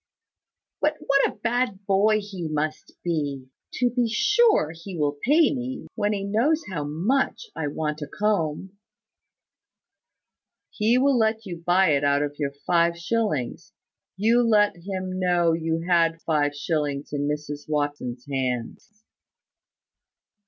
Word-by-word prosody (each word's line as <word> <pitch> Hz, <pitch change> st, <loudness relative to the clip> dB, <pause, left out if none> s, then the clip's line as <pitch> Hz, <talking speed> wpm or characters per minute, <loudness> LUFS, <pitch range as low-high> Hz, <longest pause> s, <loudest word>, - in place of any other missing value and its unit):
"But 300 Hz, 0 st, +2 dB
what 275 Hz, 0 st, +4 dB
a -, -, -8 dB
bad 230 Hz, -4 st, -1 dB
boy 210 Hz, +2 st, +3 dB
he 195 Hz, -5 st, -6 dB
must 155 Hz, 0 st, -3 dB
be! 145 Hz, -6 st, -2 dB, 0.3 s
To 245 Hz, -1 st, +1 dB
be 240 Hz, -1 st, +1 dB
sure, 420 Hz, -, +3 dB
he 175 Hz, +2 st, -9 dB
will 145 Hz, -1 st, -1 dB
pay 300 Hz, +4 st, +4 dB
me, 260 Hz, 0 st, -5 dB
when 205 Hz, -, 0 dB
he 200 Hz, -2 st, -2 dB
knows 245 Hz, +11 st, +1 dB
how 155 Hz, -5 st, -2 dB
much 195 Hz, -, 0 dB
I 150 Hz, -, -2 dB
want 150 Hz, +1 st, -3 dB
a 150 Hz, -, -4 dB
comb." 190 Hz, 0 st, -2 dB, 1.9 s
"He 225 Hz, +4 st, +2 dB
will 265 Hz, -1 st, +3 dB
tell 220 Hz, 0 st, +2 dB
you 175 Hz, -3 st, -6 dB
to 165 Hz, -, -18 dB
buy 180 Hz, +1 st, +4 dB
it 140 Hz, -1 st, +2 dB
out 140 Hz, 0 st, +3 dB
of 145 Hz, 0 st, -4 dB
your 140 Hz, -2 st, -2 dB
five 170 Hz, -1 st, +2 dB
shillings. 170 Hz, -, -2 dB, 0.4 s
You 230 Hz, +4 st, +4 dB
let 210 Hz, -4 st, +3 dB
him 185 Hz, +1 st, -5 dB
know 175 Hz, -2 st, +2 dB
you 165 Hz, 0 st, -1 dB
had 165 Hz, -2 st, +3 dB
five 145 Hz, -2 st, +1 dB
shillings 145 Hz, -2 st, -2 dB
in 145 Hz, 0 st, -1 dB
Mrs 150 Hz, 0 st, -4 dB
Watson's 145 Hz, -5 st, -2 dB
hands." 135 Hz, -, -4 dB
175 Hz, 140 wpm, -25 LUFS, 150-215 Hz, 1.9 s, what